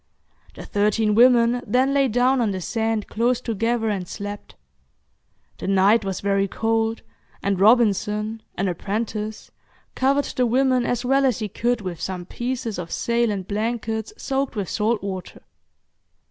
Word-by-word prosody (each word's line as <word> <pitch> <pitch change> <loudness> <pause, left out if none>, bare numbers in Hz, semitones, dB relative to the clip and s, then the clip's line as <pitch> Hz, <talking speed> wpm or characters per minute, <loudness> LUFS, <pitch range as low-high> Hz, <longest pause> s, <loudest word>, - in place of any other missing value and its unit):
The - - -9
thirteen 210 +1 +1
women 240 +1 +5
then 260 +2 +2
lay 275 -1 +3
down 250 +2 +2
on 225 - +1
the 190 -2 -3
sand 225 +2 -1
close 240 +2 +1
together, 230 0 -1
and 195 -4 -2
slept. 205 +2 -7 1.0
The - - -5
night 195 +3 +4
was 195 -2 -3
very 195 0 +1
cold, 225 +2 -1 0.4
and 200 -2 0
Robinson, 215 0 +3
an 195 - -1
apprentice, 210 +4 -4 0.4
covered 275 +2 +2
the 250 -1 0
women 255 0 +2
as 245 0 -1
well 270 +2 +3
as 255 -5 +2
he 215 - -3
could 240 +3 -1
with 180 -4 -6
some 180 -2 -4
pieces 240 -1 -4
of 170 -2 -6
sail 235 0 +1
and 195 -3 -3
blankets 220 - -2
soaked 270 -1 -2
with 200 -4 -3
salt 220 0 0
water. 190 -2 -6
225 Hz, 150 wpm, -23 LUFS, 200-245 Hz, 1.0 s, women